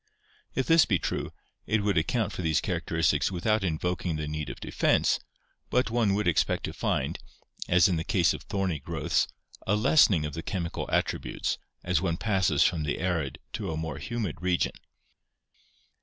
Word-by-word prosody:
If 130 - +1
this 165 -1 +6
be 95 - +3
true, - - -3 0.4
it 110 -2 +1
would 100 -1 +1
account 100 +6 0
for - - -4
these 80 -2 +2
characteristics 80 +2 0
without 105 +4 +1
invoking 90 0 -1
the 75 -1 -3
need 75 0 -4
of - - -7
defense, - - +2 0.5
but 125 -2 +1
one 115 -4 +2
would 105 -1 0
expect 85 - +2
to - - -3
find, - - -1 0.5
as 90 +2 +6
in 90 -4 0
the 80 - -2
case 90 -5 +2
of - - -7
thorny 95 -6 -2
growths, - - 0 0.4
a 100 - +3
lessening 105 - +4
of 75 - -5
the 80 - -4
chemical 85 0 -3
attributes - - -1 0.2
as 90 -2 +1
one 85 -3 0
passes 95 -8 +2
from 85 -3 +1
the 75 - -1
arid 80 -8 -1 0.2
to - - -3
a 80 - -3
more 80 -3 -4
humid 115 -10 -4
region. 90 -1 +1
90 Hz, 170 wpm, -28 LUFS, 80-100 Hz, 0.5 s, this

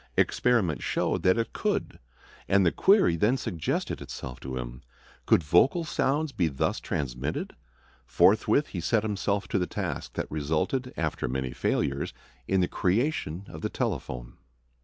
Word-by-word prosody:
Experiment 110 -11 +2
showed - - 0
that 95 +3 +4
it 115 - -1
could, - - -2 0.5
and 95 -1 +4
the 85 - +4
query 195 - +4
then 105 +10 +2
suggested 85 - -2
itself 60 -2 -7
to 65 0 -5
him, 60 0 -6 0.5
Could 85 - +5
vocal 115 - +4
sounds 150 -1 0
be 90 -9 +1
thus 70 -4 -1
transmitted? 70 +2 -3 0.5
Forthwith 110 +8 +4
he 90 - -4
set 110 +6 +1
himself 100 -1 -1
to 95 - +1
the 90 - 0
task - - -4
that - - -2
resulted, 80 - -1
after 80 -5 -1
many 65 0 -2
failures, 70 +2 -1 0.3
in 95 -1 +2
the 90 - +2
creation 100 - 0
of 80 - -9
the - - -1
telephone. - - -4
90 Hz, 150 wpm, -28 LUFS, 70-115 Hz, 0.5 s, Could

